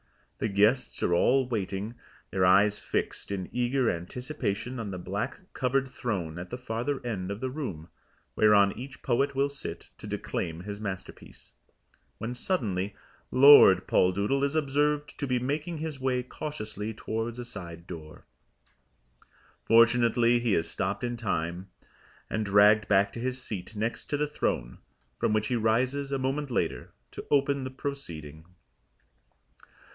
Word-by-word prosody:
The - - 0
guests 110 +5 +2
are 85 - +2
all 130 +8 +3
waiting, 105 -2 -3 0.4
their 95 0 +1
eyes 100 +3 +5
fixed - - -3
in 95 -2 -3
eager 125 0 +1
anticipation 120 - -4
on 110 -3 -4
the 95 - -5
black 90 - -4
covered 135 +1 +1
throne 100 -11 -3
at 90 - -7
the 125 - -5
farther 125 +3 -3
end 100 -6 -3
of 100 +1 -4
the 130 +1 -3
room, 100 - -5 0.5
whereon 100 -2 +5
each 135 +3 -9
poet 135 +3 +1
will 140 +1 +2
sit 140 0 -6
to - - -8
declaim 85 -1 -3
his 100 +2 -7
masterpiece, 95 -3 -8 0.6
when 115 +3 -4
suddenly 105 - -1 0.3
Lord 130 -9 +8
Poldoodle 100 +12 +2
is 140 +2 0
observed 150 0 0
to 140 - -1
be 125 -1 +1
making 150 +7 -2
his 155 -3 -5
way 130 -1 0
cautiously 110 -6 -5
towards 115 +2 -3
a 120 - -5
side 85 -7 -8
door. 80 -3 -10 1.4
Fortunately 115 +1 +4
he 120 -4 +1
is 80 - 0
stopped - - -2
in 120 0 -1
time, 90 -4 -3 0.6
and 110 - -1
dragged 105 +1 +5
back 100 0 +3
to - - -6
his 130 +1 -2
seat 110 -4 -6
next 110 +3 -2
to 145 - -2
the 150 - +1
throne, 65 - -2 0.4
from - - +1
which 110 0 +1
he 125 - +1
rises 130 +5 +1
a 135 - +1
moment 135 +2 -2
later 125 - -2 0.2
to - - -7
open 140 -1 +2
the 130 - -4
proceeding. 85 - -6
115 Hz, 150 wpm, -28 LUFS, 100-135 Hz, 1.4 s, Lord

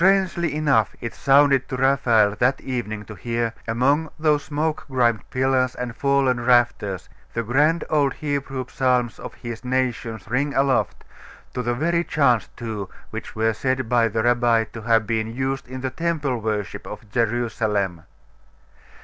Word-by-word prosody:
Strangely 185 -4 +2
enough 140 -9 +2
it 115 - -5
sounded 140 -1 +4
to 130 - -3
Raphael 120 -6 +3
that 130 +2 +2
evening 110 -5 -4
to 110 - -9
hear, 115 +2 -2
among 140 +7 +2
those 150 -2 +2
smoke 155 +1 -2
grimed 120 -5 +1
pillars 130 -1 +1
and 120 -1 -5
fallen 140 -3 +2
rafters, 120 -6 +2 0.3
the 115 - 0
grand 150 +8 +2
old 145 -3 +1
Hebrew 140 -3 -3
psalms 125 -3 0
of - - -8
his 120 0 -7
nation 125 -3 -1
ring 140 +5 0
aloft, 135 -1 +1 0.5
to 125 - -2
the 120 0 -1
very 170 +5 +1
chants, 125 -9 +2
too, 110 -4 -5 0.2
which - - -7
were 110 0 +1
said 130 +2 -1
by 120 -1 +4
the 110 0 -1
rabbi 120 -1 +3
to 115 - -7
have 115 0 +2
been 110 +1 -2
used 135 0 -2
in 130 +1 -7
the 130 0 -2
Temple 150 -4 -1
worship 105 -2 -3
of 105 +1 -9
Jerusalem.... 110 -6 0
125 Hz, 155 wpm, -23 LUFS, 115-140 Hz, 0.5 s, sounded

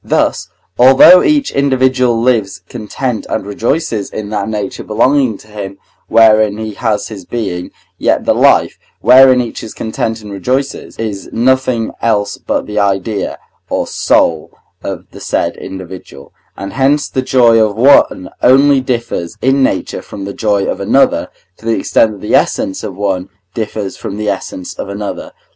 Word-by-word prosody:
Thus, - - 0 0.3
although 135 +8 +8
each 290 -2 +1
individual 130 -3 +1
lives 110 -6 0
content 120 +1 -4
and - - -2
rejoices 110 +1 -2
in 105 -1 -6
that 105 -1 -2
nature 105 -3 -4
belonging 125 +1 +1
to - - -18
him 100 -2 -7 0.3
wherein 110 -2 +4
he 110 -1 -5
has 105 -2 -2
his 100 -4 -9
being, 90 -4 -4 0.3
yet - - +1
the - - +3
life, - - +3 0.2
wherein 130 +1 +6
each 120 - -6
is 110 - -9
content 110 0 -3
and 105 - -9
rejoices, 130 +8 -3
is 105 -3 -5
nothing 125 -1 +1
else 105 -3 0
but - - -2
the 105 0 -3
idea, 100 +1 -1 0.3
or - - -1
soul, 80 -2 0 0.3
of - - -5
the - - -12
said - - -2
individual, 95 -7 -10 0.2
and 100 0 -6
hence 140 +2 +1
the 130 - -2
joy 120 -3 +4
of 105 -2 -1
one 115 -6 +3
only 135 +2 +5
differs 115 -9 -3
in 135 +2 +2
nature - - -1
from 100 - -8
the 100 - -6
joy 100 -3 0
of - - -3
another, - - +2 0.3
to - - -17
the 115 - +1
extent 110 +3 +2
that 100 - -12
the 105 - -3
essence 95 - +1
of 100 -4 -6
one 95 -2 -2 0.2
differs 105 -3 -4
from 100 - -6
the 105 0 -3
essence 95 -2 -5
of - - -7
another. 100 +1 -6
110 Hz, 160 wpm, -14 LUFS, 100-125 Hz, 0.3 s, although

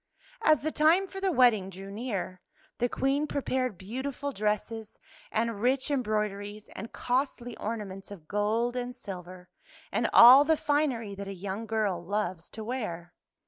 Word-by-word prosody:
As 310 -1 +4
the 310 +2 -1
time 320 +6 +4
for 385 0 -8
the 385 -1 +2
wedding 235 - +4
drew 195 +1 -9
near, 200 -5 -4 0.4
the 245 0 +1
Queen 275 +4 0
prepared 255 -7 -1
beautiful 265 +8 -4
dresses 215 0 -2 0.3
and 225 -2 -1
rich 260 +4 +1
embroideries 210 -4 -2
and 225 +5 -8
costly 245 -2 -2
ornaments 205 -3 -5
of 180 -7 -11
gold 220 +5 0
and 245 0 -3
silver 185 -5 -8 0.4
and - - +1
all 255 +4 +10
the 320 +1 +2
finery 290 -9 0
that 200 0 -7
a 195 - -5
young 200 +4 -5
girl 205 -5 0
loves 185 -3 -3
to 220 - -8
wear. 180 -8 -4
225 Hz, 150 wpm, -29 LUFS, 200-260 Hz, 0.4 s, all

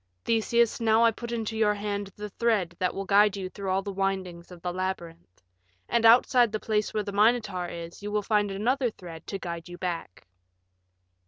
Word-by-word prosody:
Theseus, 230 0 +2
now 225 0 +4
I 230 - +5
put 235 +2 -7
into 225 -1 -3
your 210 -1 +2
hand 205 -1 -3
the 210 0 -6
thread 205 -7 0
that 180 - 0
will 195 - -3
guide 205 +1 +4
you 185 -1 -4
through 195 0 -6
all 190 +1 +1
the 200 - -4
windings 185 -3 -3
of 180 - -11
the 180 -1 -2
labyrinth. 170 - -5 0.4
And 230 -1 +1
outside 240 0 +5
the 215 - -2
place 215 -1 -1
where 215 - -1
the 200 - -5
Minotaur 210 -3 +2
is 170 +1 -8
you 205 - -5
will 210 0 0
find 210 -1 +1
another 240 +6 0
thread 175 -6 -11
to 195 - -3
guide 170 -2 -6
you 175 - -8
back." 170 - -5
200 Hz, 195 wpm, -27 LUFS, 185-220 Hz, 0.4 s, I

